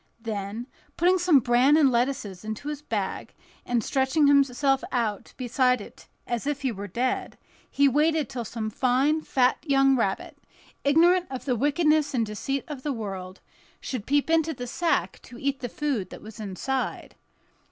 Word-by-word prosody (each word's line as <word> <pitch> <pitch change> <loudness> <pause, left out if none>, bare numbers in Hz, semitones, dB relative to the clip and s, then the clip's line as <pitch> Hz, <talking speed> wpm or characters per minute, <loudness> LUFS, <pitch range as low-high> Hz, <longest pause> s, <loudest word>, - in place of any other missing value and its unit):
Then, 215 0 -4 0.3
putting 360 +2 +3
some 350 -4 +5
bran 245 +5 +4
and 285 -4 +5
lettuces 235 -6 -1
into 220 +7 -5
his 295 -1 -5
bag, 210 -9 -4 0.3
and 240 -2 +1
stretching 270 +3 +2
himself 275 -1 +3
out 225 -5 -2
beside 250 0 +2
it 205 - -12 0.2
as 240 +3 -3
if 290 -1 -2
he 260 - +1
were 200 -1 -6
dead, 245 +7 -2 0.3
he 280 0 +3
waited 300 +1 +2
till 240 +1 -5
some 220 0 -4
fine, 265 +7 +2
fat 255 -4 +2
young 270 -2 +3
rabbit, 195 -6 -2 0.4
ignorant 345 +5 +4
of 260 -1 -6
the 255 -3 +1
wickedness 300 +3 +2
and 230 -2 +1
deceit 260 +6 -3
of 295 -5 -7
the 290 - -2
world, 195 -5 -6 0.4
should 245 -6 -5
peep 285 0 +2
into 320 -1 +2
the 245 - -6
sack 330 +7 -1
to 245 - -13
eat 275 +1 -2
the 245 - -4
food 275 -10 -2
that - - -11
was 220 +1 -11
inside. 220 +6 -3
260 Hz, 165 wpm, -26 LUFS, 230-290 Hz, 0.4 s, some